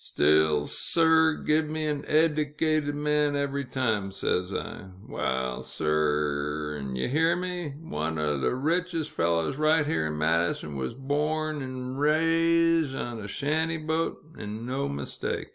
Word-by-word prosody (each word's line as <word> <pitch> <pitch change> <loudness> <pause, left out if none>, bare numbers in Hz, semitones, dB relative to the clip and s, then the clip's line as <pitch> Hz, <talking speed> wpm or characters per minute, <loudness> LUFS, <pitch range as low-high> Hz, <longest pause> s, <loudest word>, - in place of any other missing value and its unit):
Still, 75 0 +3
sir 160 - +3
r, - - -10
give 155 +1 +2
me 155 0 -2
an 150 -2 -1
eddicated 155 -1 +1
man 150 0 +1
every 140 -1 -1
time, 110 -7 -1
says 90 -1 -1
I. 95 - -5 0.2
Waal, 65 -1 -2
sir 75 -1 -1
r, - - -5
'n' 65 -2 -5
ye 65 - -1
hear 160 +5 +3
me, 180 -5 -4
one 80 - -3
o' 75 -2 0
th' 65 - +1
richest 165 +4 -1
fellers 85 +6 0
right 155 0 +3
here 145 - 0
in 75 0 -4
Madison, 80 -1 0
wuz 65 - -3
born 150 +2 -1
'n' 130 0 -5
riz 165 0 +3
on 120 -3 -4
a 100 - -6
shanty 155 +8 -1
boat, 160 +1 -1 0.2
'n' 105 +2 -6
no 135 +3 -2
mistake. 70 0 -4
140 Hz, 150 wpm, -27 LUFS, -, 0.2 s, Still